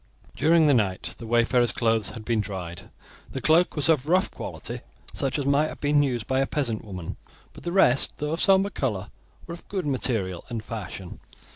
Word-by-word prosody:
During 160 +2 +4
the 145 - +5
night 100 -7 0
the 115 - -8
wayfarer's 120 +1 +3
clothes 115 -3 +1
had 110 -3 -9
been 115 -2 +1
dried. 90 -4 -7 0.4
The 135 - -3
cloak 165 +5 +3
was 150 -1 +2
of 150 -4 +2
rough 185 +3 +2
quality, - - -6 0.3
such 135 +1 -1
as 145 - -2
might 140 +2 +3
have - - -8
been 145 0 +3
used 125 -6 -1
by 130 +3 0
a 135 - +1
peasant 120 -7 -1
woman; 95 -6 -7 0.4
but - - -12
the 170 - -1
rest, 140 -8 +4
though 150 +1 -2
of 165 - -1
sombre 195 0 +4
colour, 105 - -2 0.3
were 170 - -7
of 170 - -11
good 190 -4 -3
material 115 -10 -1
and 115 -2 -4
fashion. 95 -5 -7
130 Hz, 195 wpm, -26 LUFS, 110-150 Hz, 0.4 s, the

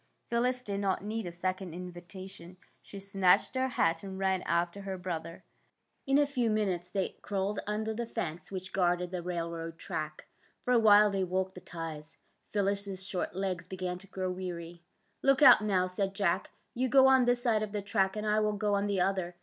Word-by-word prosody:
'' - - -45
Phyllis 250 +2 +1
did 200 -3 -3
not 195 -1 0
need 215 -1 -3
a - - -4
second 185 0 -3
invitation. 180 0 -9 0.2
She 200 - -10
snatched 195 -2 +3
her 260 0 +1
hat 165 -10 +1
and 190 -1 -7
ran 190 -1 +1
after 170 +3 0
her 195 -1 -4
brother. 170 -2 -5 0.6
In 270 +1 +4
a 290 - +5
few 255 -5 0
minutes 190 -5 0
they 190 0 -2
crawled 200 0 -2
under 215 +1 -1
the 235 +1 -3
fence 175 -7 -5
which 185 -1 -6
guarded 180 -1 +1
the 180 -1 -3
railroad 170 -1 -4
track. 155 -1 -5 0.4
For 250 - +1
a 240 - +6
while 210 -1 +7
they 195 -1 0
walked 190 +1 -1
the 180 - -10
ties. 160 -3 -7 0.3
Phyllis 200 0 0
's 190 -1 -5
short 185 -2 -3
legs 185 -3 -2
began 180 -1 -4
to 195 - -15
grow 185 -1 -3
weary. 175 -2 -6 0.2
'' - - -44
Look 275 +1 +4
out, 275 - +9
now," 190 -3 +2
said 195 +1 -2
Jack. 190 -1 +1
'' - - -44
You 255 +2 0
go 265 +1 +7
on 265 -1 +6
this 245 0 +2
side 225 -3 +2
of 215 -1 -3
the 205 -1 -3
track, 195 -1 +1
and 215 0 -3
I 210 0 +3
will 215 0 +1
go 210 -1 0
on 200 0 +1
the 200 -2 0
other. 180 -2 0
190 Hz, 210 wpm, -31 LUFS, 180-210 Hz, 0.6 s, out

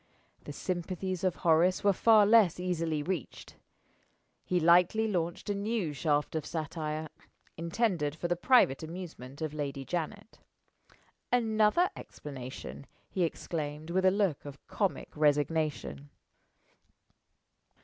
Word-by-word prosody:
The - - -6
sympathies 185 0 -3
of 185 -2 +1
Horace 170 +4 +3
were 200 -1 +4
far 215 +1 +5
less 205 -6 +5
easily 165 -4 -1
reached. 175 -5 -5 0.9
He 180 - 0
lightly 180 +6 +4
launched 175 -4 -2
a 205 - 0
new 200 -5 -2
shaft 145 +1 0
of 160 - -1
satire 155 0 -4 0.5
intended 170 -3 -1
for 175 - -3
the 175 - +1
private 180 - +4
amusement 160 -5 -8
of 155 -1 -3
Lady 140 -2 -4
Janet. 180 - -5 0.9
"Another 225 +7 +3
explanation!" 135 0 -8 0.2
he 185 - -2
exclaimed, 155 -1 -4
with 185 +2 +1
a 190 - +6
look 190 -6 0
of 140 -1 -9
comic 200 -3 -2
resignation. 150 -1 0
170 Hz, 120 wpm, -30 LUFS, 150-190 Hz, 0.9 s, a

